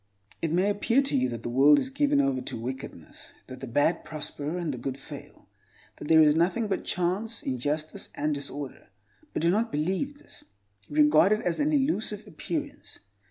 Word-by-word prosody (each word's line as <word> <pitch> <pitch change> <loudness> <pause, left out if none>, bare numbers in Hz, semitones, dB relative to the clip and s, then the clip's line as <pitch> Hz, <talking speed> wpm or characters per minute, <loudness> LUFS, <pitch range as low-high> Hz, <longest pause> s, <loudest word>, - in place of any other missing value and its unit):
It 165 - -1
may 185 +5 +3
appear 230 +6 +2
to 275 - -1
you 130 0 +2
that 115 -1 -6
the - - -3
world 140 +4 +6
is 260 - -1
given 285 +1 +2
over 275 -1 +1
to 250 - -5
wickedness; 125 - -8
that 130 0 -9
the 135 - -6
bad 145 +8 +1
prosper, 155 +1 -5
and 170 -5 -2
the 125 - -6
good 130 +2 -4
fail; - - -11 0.5
that - - -7
there 160 0 +7
is 150 -1 +5
nothing 185 +8 +1
but 195 - -1
chance, 190 +6 -1
injustice, 145 +4 -3
and 150 +1 0
disorder. 140 -1 -6 0.4
But - - -2
do 170 - +4
not 225 +4 +1
believe 190 - -1
this: - - -16 0.5
regard 150 +6 +5
it 215 - 0
as 175 -2 -1
an 295 +1 +2
elusive 265 -8 0
appearance. 295 -3 -5
165 Hz, 185 wpm, -27 LUFS, 145-225 Hz, 0.5 s, there